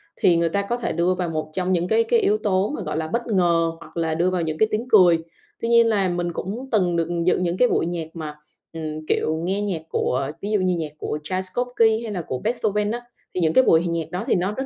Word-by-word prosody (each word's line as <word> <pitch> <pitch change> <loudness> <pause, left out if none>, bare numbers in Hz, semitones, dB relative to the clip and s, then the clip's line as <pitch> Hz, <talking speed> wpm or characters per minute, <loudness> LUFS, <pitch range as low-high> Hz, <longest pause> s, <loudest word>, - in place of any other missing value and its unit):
Thì 170 -2 +3
người 170 0 +2
ta 200 +4 0
có 235 +5 -2
thể 240 - -2
đưa 170 +3 +1
vào 180 -2 -2
một 155 -1 -3
trong 185 0 -1
những 175 0 +1
cái 225 +2 +3
cái 230 +1 +2
yếu 210 -1 +2
tố 200 -1 +1
mà, - - -5
gọi - - -3
là, 160 0 -2
bất 235 +6 -2
ngờ 170 -5 +2
hoặc 170 - -13
là 160 -1 0
đưa 175 +3 +2
vào 185 -1 -1
những 155 -1 -2
cái 220 - +3
tiếng 225 +4 -2
cười. 180 -5 +6 0.4
Tuy 230 - -1
nhiên 235 0 +5
là 195 -4 +2
mình 175 0 -2
cũng 230 +11 -5
từng 180 -5 +2
được 165 -1 0 0.2
dự 180 - +3
những 180 0 -1
cái 250 - +5
buổi - - +1
nhạc 170 -2 -3
mà, 155 -3 -6 0.4
ừm, 155 -1 -5
kiểu 155 - +1
nghe 195 +3 -1
nhạc 190 -6 -2
của 135 +1 -1
ví 205 +2 -3
dụ 210 - +2
như 185 -1 +1
nhạc 160 -3 -4
của 150 - -3
Tchaikovsky, 220 +5 +1
hay 225 - -5
là 185 -4 -3
của 130 -5 -4
Beethoven 210 -2 0
á, 240 +1 -3 0.3
thì 180 - -1
những 160 -1 +2
cái 260 - +6
buổi 160 -6 +5
hòa 175 - -2
nhạc 165 -1 -3
đó 180 +4 -3
thì - - +3
nó 185 +3 0
rất 265 +5 -3
180 Hz, 270 wpm, -23 LUFS, 165-215 Hz, 0.4 s, cười